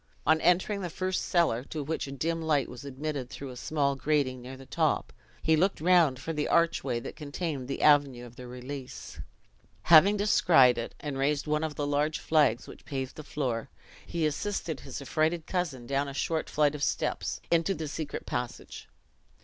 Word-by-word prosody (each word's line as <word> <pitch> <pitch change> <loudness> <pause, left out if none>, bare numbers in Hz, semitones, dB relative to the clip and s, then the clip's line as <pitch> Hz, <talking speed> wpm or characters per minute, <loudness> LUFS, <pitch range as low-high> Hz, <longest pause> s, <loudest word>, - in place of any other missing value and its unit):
On 160 +1 +4
entering 190 +3 +2
the 180 - -3
first 185 +3 -2
cellar, 165 -9 +2
to 150 0 -5
which 155 0 -3
a - - -7
dim 165 +4 -2
light 150 -5 +1
was 125 +1 -10
admitted 140 -1 -4
through 135 -1 -7
a - - -9
small 140 +1 0
grating 135 -3 0
near 130 +2 -9
the 135 - -12
top, - - 0 0.3
he 160 - +4
looked 190 +5 +1
round 165 -5 +4
for 150 +6 -5
the 150 -1 -1
archway 170 -7 +2
that - - -8
contained 150 -2 -4
the 135 - -3
avenue 140 -5 +4
of 120 0 -13
their 125 -1 -9
release. 125 +2 -8 0.6
Having 175 +6 +7
descried 160 - +5
it, 115 - -5
and 140 -3 -4
raised 145 +1 +1
one 150 0 0
of 155 -2 -3
the 145 - -2
large 145 +2 0
flags 145 -7 +2
which - - -12
paved 135 -2 -4
the 155 - -8
floor, 125 -7 -3 0.3
he 170 -2 -2
assisted 160 -1 -2
his 135 +1 -7
affrighted 155 +3 0
cousin 160 -10 -2
down 140 +2 0
a 140 - -7
short 160 +2 -1
flight 150 -1 +2
of 150 - -6
steps, - - -1
into 170 +3 +2
the 160 -2 -4
secret 145 0 -5
passage. 125 -1 -5
145 Hz, 190 wpm, -29 LUFS, 135-160 Hz, 0.6 s, Having